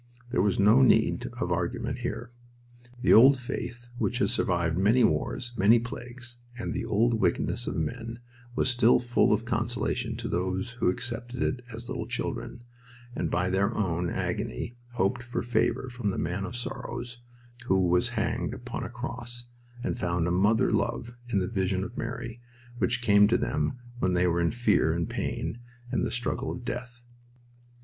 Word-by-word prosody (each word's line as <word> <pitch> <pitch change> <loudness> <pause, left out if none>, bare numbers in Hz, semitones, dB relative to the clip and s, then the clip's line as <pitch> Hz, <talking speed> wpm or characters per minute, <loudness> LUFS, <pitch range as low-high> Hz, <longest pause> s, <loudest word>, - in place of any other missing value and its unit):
There - - +2
was 100 0 +2
no 105 +6 +6
need 130 - +4
of - - -1
argument - - -1
here. 120 0 -4 0.7
The - - +6
old 135 +5 +8
faith 120 -1 -5
which 120 - 0
has 125 - +2
survived 85 -7 +1
many 105 +7 +4
wars, 120 +2 0
many 105 +4 +6
plagues, 120 0 -6 0.2
and 115 - -3
the - - -2
old 115 +2 +2
wickedness - - +1
of - - -2
men 115 +9 -3 0.4
was - - +2
still 120 -2 +5
full 120 0 +2
of 110 +2 +2
consolation 120 -1 -1
to 115 -1 -4
those 95 +4 -1
who 115 -6 +1
accepted 120 +5 -3
it 130 - -1
as 115 +1 -8
little 110 - -4
children, 120 -1 -4 0.5
and - - -1
by 90 +2 +1
their 95 +1 +1
own 90 -4 0
agony 120 - -3 0.2
hoped 120 +2 +1
for 120 +1 -3
favor 120 +2 +1
from 120 -4 -2
the 95 - -2
Man 100 -1 -2
of 115 - -6
Sorrows 120 0 -5 0.5
who 95 -1 +3
was 90 +7 +3
hanged 110 +2 -1
upon 125 -1 -5
a - - -4
cross, 120 -1 -5 0.4
and - - -2
found 85 -1 0
a - - 0
mother 105 +5 +3
love 120 0 -1 0.2
in 100 - +2
the 90 -1 +1
vision 95 -2 0
of 100 - -7
Mary, 115 0 -5 0.4
which 120 +1 +1
came 105 -2 +6
to 115 - +3
them 130 - -1 0.2
when 90 -4 +1
they 90 0 +3
were 85 -1 +2
in 85 - +3
fear 105 -9 +2
and 85 -1 -1
pain 120 - -3 0.3
and - - +1
the - - 0
struggle 125 +2 -2
of 125 - -7
death. 120 -1 -5
115 Hz, 175 wpm, -28 LUFS, 95-120 Hz, 0.7 s, old